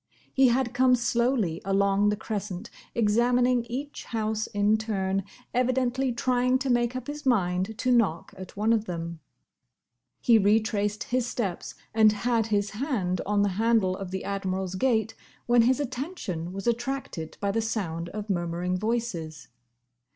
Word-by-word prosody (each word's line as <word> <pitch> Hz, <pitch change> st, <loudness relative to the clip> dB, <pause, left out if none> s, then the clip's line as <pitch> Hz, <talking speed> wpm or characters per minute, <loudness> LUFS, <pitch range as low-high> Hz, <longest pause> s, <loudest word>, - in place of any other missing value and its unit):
He 265 Hz, -1 st, +5 dB
had 245 Hz, 0 st, +1 dB
come 255 Hz, 0 st, +5 dB
slowly 235 Hz, -7 st, 0 dB
along 200 Hz, +1 st, +2 dB
the 210 Hz, -, +1 dB
crescent, 205 Hz, -2 st, -5 dB, 0.2 s
examining 240 Hz, +2 st, +3 dB
each 270 Hz, +5 st, -6 dB
house 220 Hz, -1 st, -2 dB
in 205 Hz, 0 st, +2 dB
turn, 195 Hz, -3 st, -1 dB, 0.3 s
evidently 255 Hz, +1 st, +1 dB
trying 250 Hz, +1 st, +2 dB
to 265 Hz, 0 st, -1 dB
make 240 Hz, 0 st, +1 dB
up 255 Hz, -1 st, -4 dB
his 295 Hz, +1 st, -6 dB
mind 195 Hz, -4 st, +1 dB
to 255 Hz, -, +1 dB
knock 205 Hz, -9 st, +1 dB
at 185 Hz, +1 st, -10 dB
one 215 Hz, +2 st, +3 dB
of 220 Hz, -1 st, +1 dB
them. 170 Hz, -2 st, -5 dB, 1.0 s
He 230 Hz, -3 st, +5 dB
retraced 210 Hz, 0 st, +1 dB
his 250 Hz, -1 st, -1 dB
steps 210 Hz, -7 st, -3 dB, 0.2 s
and 215 Hz, -1 st, +5 dB
had 225 Hz, +1 st, 0 dB
his 205 Hz, -1 st, 0 dB
hand 210 Hz, -, -1 dB
on 205 Hz, 0 st, +2 dB
the 205 Hz, -, +2 dB
handle 225 Hz, -5 st, +3 dB
of 190 Hz, -1 st, -6 dB
the 190 Hz, 0 st, -4 dB
Admiral's 190 Hz, -2 st, -2 dB
gate, 220 Hz, +1 st, +1 dB, 0.3 s
when 240 Hz, 0 st, +5 dB
his 255 Hz, +3 st, +3 dB
attention 250 Hz, -, -4 dB
was 195 Hz, +1 st, -6 dB
attracted 240 Hz, -8 st, -3 dB
by 200 Hz, -1 st, 0 dB
the 225 Hz, -, 0 dB
sound 175 Hz, -7 st, -3 dB
of 210 Hz, +3 st, -6 dB
murmuring 175 Hz, -1 st, -1 dB
voices. 180 Hz, -, -3 dB
220 Hz, 150 wpm, -27 LUFS, 195-245 Hz, 1.0 s, He